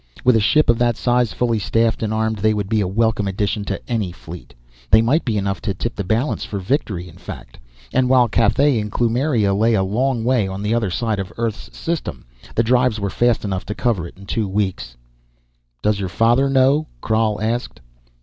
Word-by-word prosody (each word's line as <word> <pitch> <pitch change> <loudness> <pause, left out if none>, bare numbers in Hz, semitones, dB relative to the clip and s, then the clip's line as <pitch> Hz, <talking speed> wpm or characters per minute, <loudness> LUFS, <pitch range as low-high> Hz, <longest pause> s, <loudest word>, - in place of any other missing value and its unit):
With 125 -1 +5
a - - +4
ship 110 +9 +3
of 120 -1 +3
that 120 -2 +2
size, 120 -3 +1
fully 115 +3 0
staffed 115 +3 +1
and 110 -1 -1
armed, 110 0 0
they 110 +1 +2
would 100 -2 -2
be 110 -2 +2
a 95 - 0
welcome 110 +1 +1
addition 100 +2 -1
to - - -3
any 110 -7 -1
fleet. 80 -8 -11 0.3
They 110 - +7
might 130 +9 +2
be 115 -4 -1
enough 100 -1 -2
to 100 -3 -2
tip 115 +5 -4
the 100 - -3
balance 110 +10 -1
for 100 - -5
victory, 95 - -2
in 80 - -14
fact. - - -10 0.3
And 130 -1 +2
while 125 -2 +5
Cathay 115 +4 +2
and 105 0 -4
Kloomiria 120 -3 +1
lay 110 +2 +3
a 95 - +2
long 120 +5 0
way 120 -4 +2
on 95 +1 -5
the 105 +2 0
other 115 -4 0
side 110 +2 -1
of 95 -1 -5
Earth's 115 -2 -4
system, 165 -1 -4 0.3
the 115 - +3
drives 125 -1 +2
were 100 -1 -2
fast 120 -2 +1
enough 95 -2 -2
to 105 - -4
cover 105 -9 0
it - - -15
in 100 - -13
two 110 +1 -1
weeks. 95 -11 -3 0.9
"Does 105 -1 +1
your 95 -2 -3
father 120 +8 +3
know?" 135 +3 +3 0.2
Krhal 110 -1 +1
asked. 115 +3 -2
110 Hz, 210 wpm, -20 LUFS, 100-120 Hz, 0.9 s, They